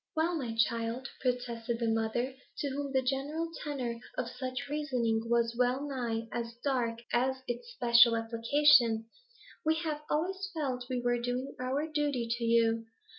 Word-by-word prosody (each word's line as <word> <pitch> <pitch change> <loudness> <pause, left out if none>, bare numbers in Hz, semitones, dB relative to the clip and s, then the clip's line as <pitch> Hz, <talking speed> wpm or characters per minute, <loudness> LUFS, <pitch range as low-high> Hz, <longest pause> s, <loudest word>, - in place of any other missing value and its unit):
'Well, 330 +2 +1
my 245 -8 -3
child,' 230 +2 0
protested 240 -2 -1
the 230 -1 -1
mother, 225 +3 0 0.2
to 285 - -1
whom 280 0 -3
the 265 -1 +2
general 290 +6 -1
tenor 255 -6 -3 0.2
of 250 -2 -1
such 255 +2 -4
reasoning 245 -6 0
was 235 0 +2
well 250 +4 +1
nigh 235 -4 -2
as 235 -1 -4
dark 245 -5 0 0.2
as 260 +2 +1
its 240 - -4
special 235 - +6
application, 230 +1 +4 0.6
'we 315 +1 +3
have 305 -3 -2
always 375 +5 -1
felt 255 -5 -2
we 250 -1 -1
were 245 0 +2
doing 245 +3 -2
our 260 +4 -1
duty 290 -6 0
to 235 0 -1
you. 230 -1 +3
250 Hz, 155 wpm, -31 LUFS, 230-280 Hz, 0.6 s, special